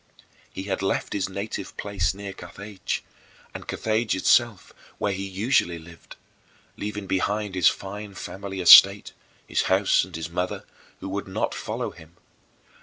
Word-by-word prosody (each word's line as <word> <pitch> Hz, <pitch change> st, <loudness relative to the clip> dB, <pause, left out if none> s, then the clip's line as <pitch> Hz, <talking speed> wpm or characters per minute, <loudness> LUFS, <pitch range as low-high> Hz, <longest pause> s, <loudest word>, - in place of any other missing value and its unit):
He 95 Hz, -, -6 dB
had 95 Hz, -1 st, -3 dB
left 95 Hz, -, -1 dB
his 95 Hz, -2 st, -1 dB
native 100 Hz, 0 st, -5 dB
place 100 Hz, -4 st, -1 dB
near 100 Hz, -1 st, -7 dB
Carthage 100 Hz, 0 st, -6 dB, 0.5 s
and -, -, -8 dB
Carthage 110 Hz, 0 st, 0 dB
itself, 115 Hz, +2 st, +2 dB, 0.2 s
where 100 Hz, -, -1 dB
he 95 Hz, +1 st, -4 dB
usually 95 Hz, -2 st, +1 dB
lived 85 Hz, +1 st, -14 dB, 0.6 s
leaving 105 Hz, -1 st, -5 dB
behind 100 Hz, +2 st, -1 dB
his 90 Hz, -3 st, +4 dB
fine 100 Hz, +1 st, -3 dB
family 95 Hz, -1 st, -6 dB
estate, 100 Hz, +3 st, +8 dB, 0.3 s
his -, -, 0 dB
house, 95 Hz, +1 st, +4 dB
and 95 Hz, -3 st, -9 dB
his 80 Hz, 0 st, -4 dB
mother, 90 Hz, +1 st, -3 dB, 0.4 s
who 95 Hz, -, -5 dB
would 100 Hz, 0 st, -4 dB
not 95 Hz, -, -2 dB
follow -, -, -4 dB
him. 80 Hz, +2 st, -17 dB
95 Hz, 145 wpm, -25 LUFS, 95-100 Hz, 0.6 s, estate